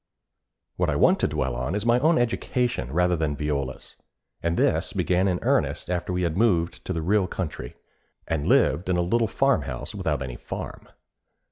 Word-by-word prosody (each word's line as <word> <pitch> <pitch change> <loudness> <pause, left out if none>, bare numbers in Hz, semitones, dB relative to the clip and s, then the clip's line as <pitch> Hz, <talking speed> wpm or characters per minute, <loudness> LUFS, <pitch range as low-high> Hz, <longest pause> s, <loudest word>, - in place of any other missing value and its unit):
What - - +1
I - - 0
want - - +4
to - - +2
dwell 65 -2 -2
on 65 +9 -2
is 105 +1 -2
my 120 +1 +4
own 160 +5 +3
education 120 - -1
rather 90 +3 +2
than 80 -3 -1
Viola's, 70 -3 -4 0.4
and 85 0 -1
this - - +1
began 90 +1 +1
in 90 -2 +1
earnest - - 0
after 90 0 -2
we 90 0 -1
had 85 -2 -1
moved 90 -6 +1
to 95 - -2
the 80 -2 -3
real 100 +2 +2
country, 75 -10 -5 0.5
and 80 -3 -1
lived 90 +2 +3
in 90 - +2
a - - +2
little 115 +6 +1
farmhouse 105 - 0
without 65 - -2
any 65 -1 -6
farm. - - -7
90 Hz, 180 wpm, -25 LUFS, 75-100 Hz, 0.5 s, want